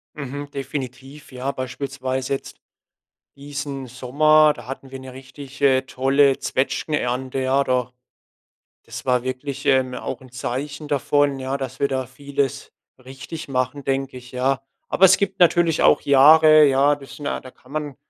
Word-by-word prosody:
Mhm. 145 Hz, 0 st, -6 dB
Definitiv. 135 Hz, +1 st, -7 dB
Ja, 130 Hz, +2 st, -3 dB
beispielsweise 130 Hz, 0 st, -3 dB
jetzt -, -, -8 dB, 0.8 s
diesen 140 Hz, -1 st, -6 dB
Sommer, 150 Hz, +5 st, +3 dB
da -, -, -12 dB
hatten 135 Hz, 0 st, -8 dB
wir 135 Hz, -, -8 dB
'ne 130 Hz, -1 st, -10 dB
richtig, 135 Hz, +1 st, -12 dB
äh, 135 Hz, -2 st, +4 dB
tolle 135 Hz, +1 st, +2 dB
Zwetschgenernte, 130 Hz, -1 st, -2 dB
ja, 135 Hz, +2 st, +2 dB
da 125 Hz, -1 st, 0 dB, 1.0 s
das -, -, -8 dB
war 125 Hz, -1 st, +2 dB
wirklich, 130 Hz, +2 st, -5 dB
ähm, 130 Hz, -2 st, +2 dB
auch 125 Hz, 0 st, -5 dB
'n 130 Hz, -1 st, -15 dB
Zeichen 140 Hz, +4 st, -5 dB
davon, 145 Hz, 0 st, +1 dB
ja, 130 Hz, +1 st, -3 dB
dass 135 Hz, -1 st, -7 dB
wir 140 Hz, -, +2 dB
da 130 Hz, -2 st, -2 dB
vieles 140 Hz, +1 st, -3 dB, 0.3 s
richtig 135 Hz, +5 st, -9 dB
machen, 130 Hz, +2 st, -2 dB
denke 135 Hz, -1 st, -2 dB
ich, 125 Hz, 0 st, -12 dB
ja. 130 Hz, +1 st, 0 dB, 0.3 s
Aber 190 Hz, -, +3 dB
es 185 Hz, -, +6 dB
gibt 195 Hz, -1 st, -2 dB
natürlich 170 Hz, -2 st, +4 dB
auch -, -, +5 dB
Jahre, 155 Hz, +2 st, +7 dB
ja, 140 Hz, +1 st, +4 dB
das 140 Hz, -2 st, -12 dB
sind 145 Hz, -, -9 dB
ja -, -, -2 dB
da 130 Hz, -, -12 dB
kann 125 Hz, +1 st, -20 dB
man 150 Hz, -3 st, -4 dB
135 Hz, 160 wpm, -22 LUFS, 130-145 Hz, 1.0 s, Jahre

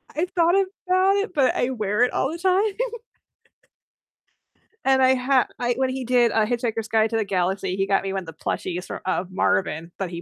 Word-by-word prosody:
I've 345 Hz, +4 st, -1 dB
thought 345 Hz, 0 st, +3 dB
of 390 Hz, -1 st, +3 dB, 0.2 s
that, 390 Hz, +3 st, +2 dB
but 275 Hz, -5 st, +2 dB
I 245 Hz, -, 0 dB
wear 215 Hz, -2 st, 0 dB
it 250 Hz, -, +2 dB
all 270 Hz, -, 0 dB
the 335 Hz, -, -5 dB
time. 380 Hz, +3 st, +2 dB, 2.1 s
And 265 Hz, 0 st, +4 dB
I 260 Hz, 0 st, +5 dB
ha 255 Hz, 0 st, +2 dB
I 245 Hz, 0 st, 0 dB
when 260 Hz, 0 st, +1 dB
he 260 Hz, 0 st, -4 dB
did, 240 Hz, -1 st, +3 dB
uh, 220 Hz, -1 st, +2 dB
Hitchhiker's 230 Hz, -2 st, -2 dB
Guide 220 Hz, 0 st, +2 dB
to 225 Hz, -, 0 dB
the 220 Hz, -, +1 dB
Galaxy, 190 Hz, -1 st, -1 dB
he 195 Hz, 0 st, 0 dB
got 195 Hz, 0 st, +2 dB
me 195 Hz, -, -3 dB
one 190 Hz, -1 st, -3 dB
of -, -, -15 dB
the 165 Hz, -, -9 dB
plushies 180 Hz, +3 st, -4 dB
fro -, -, -6 dB
of 185 Hz, 0 st, -2 dB
Marvin 165 Hz, -3 st, 0 dB
that 190 Hz, -3 st, -3 dB
he 170 Hz, -1 st, -7 dB
240 Hz, 210 wpm, -23 LUFS, 195-270 Hz, 2.1 s, I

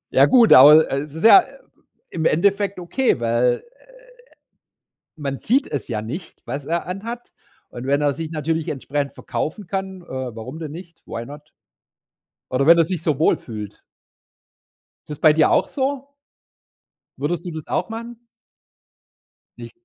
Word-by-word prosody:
Ja -, -, +7 dB
gut, 240 Hz, -4 st, +6 dB
aber, 150 Hz, +4 st, +8 dB
äh, 135 Hz, -, 0 dB
es 145 Hz, 0 st, -8 dB
ist 165 Hz, -, -3 dB
ja 370 Hz, +10 st, +9 dB, 0.7 s
im 160 Hz, -1 st, -3 dB
Endeffekt 200 Hz, +3 st, +1 dB
okay, 180 Hz, -, 0 dB
weil, 120 Hz, +1 st, +1 dB, 0.2 s
äh, -, -, -25 dB, 1.3 s
man 140 Hz, -2 st, -4 dB
sieht 265 Hz, +5 st, +1 dB
es 145 Hz, -, -4 dB
ja 110 Hz, -2 st, -2 dB
nicht, 155 Hz, -, -8 dB
was 135 Hz, +4 st, -5 dB
er 170 Hz, +1 st, -2 dB
anhat. 230 Hz, +6 st, -7 dB, 0.4 s
Und 120 Hz, +2 st, -8 dB
wenn 140 Hz, +1 st, +1 dB
er 145 Hz, -1 st, +1 dB
sich 165 Hz, +1 st, -6 dB
natürlich 160 Hz, +1 st, -2 dB
entsprechend 140 Hz, 0 st, -3 dB
verkaufen 170 Hz, +4 st, -5 dB
kann, 190 Hz, -1 st, -5 dB
äh, -, -, -19 dB
warum 130 Hz, +2 st, -7 dB
denn 155 Hz, -3 st, -6 dB
nicht? 170 Hz, 0 st, -12 dB
Why 115 Hz, +1 st, -6 dB
not? 150 Hz, +2 st, -12 dB, 1.0 s
Oder 135 Hz, +3 st, +1 dB
wenn 170 Hz, 0 st, +8 dB
er 165 Hz, -, +4 dB
sich 180 Hz, -2 st, -4 dB
so 150 Hz, -4 st, 0 dB
wohlfühlt. 110 Hz, -9 st, -2 dB, 1.3 s
Ist -, -, -10 dB
das 150 Hz, -, -7 dB
bei 155 Hz, -1 st, +5 dB
dir 155 Hz, -1 st, +3 dB
auch -, -, +2 dB
so? 275 Hz, 0 st, -3 dB, 1.1 s
Würdest 170 Hz, +5 st, -3 dB
du 175 Hz, -, -5 dB
das 155 Hz, -1 st, -8 dB
auch -, -, -2 dB
machen? 230 Hz, +1 st, -8 dB, 1.4 s
Nicht. -, -, -10 dB
155 Hz, 155 wpm, -21 LUFS, 140-190 Hz, 1.4 s, ja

